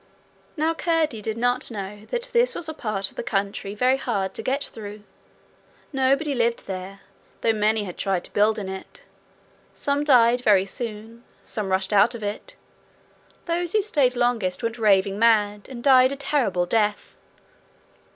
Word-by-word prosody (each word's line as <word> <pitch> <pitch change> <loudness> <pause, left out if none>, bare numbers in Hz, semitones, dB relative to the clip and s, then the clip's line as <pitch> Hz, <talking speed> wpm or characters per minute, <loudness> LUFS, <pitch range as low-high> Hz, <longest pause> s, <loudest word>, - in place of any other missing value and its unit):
Now 315 +2 +1
Curdie 325 -9 0
did 220 +1 -3
not 245 +1 0
know 205 -1 -7
that - - -3
this 480 +1 +3
was 345 - -5
a 315 - -4
part 200 -8 -1
of - - -23
the - - -2
country 200 -2 -3
very 255 +4 +2
hard 195 -7 -2
to - - -3
get 275 +2 -1
through. 210 -3 -8 0.9
Nobody 275 +3 +2
lived 235 -2 0
there, 190 +1 -7 0.4
though 225 - +2
many 215 0 +1
had 180 -3 -8
tried 190 -3 -1
to - - -10
build 210 +2 +3
in 200 -3 -4
it. 190 0 -8 0.7
Some 285 0 -1
died 245 -4 +5
very 200 -5 +4
soon. 225 +1 -7 0.2
Some 210 -5 -4
rushed 190 +2 0
out 205 +4 +4
of 225 - -8
it. 210 - -5 0.9
Those 340 0 -1
who 425 -2 +3
stayed 275 -10 +2
longest 240 -5 0
went 230 +1 -3
raving 200 -2 +3
mad, 210 -3 +2
and 240 -3 -8
died 260 -1 +6
a - - -2
terrible 270 - 0
death. 210 +2 -1
225 Hz, 165 wpm, -24 LUFS, 205-265 Hz, 0.9 s, died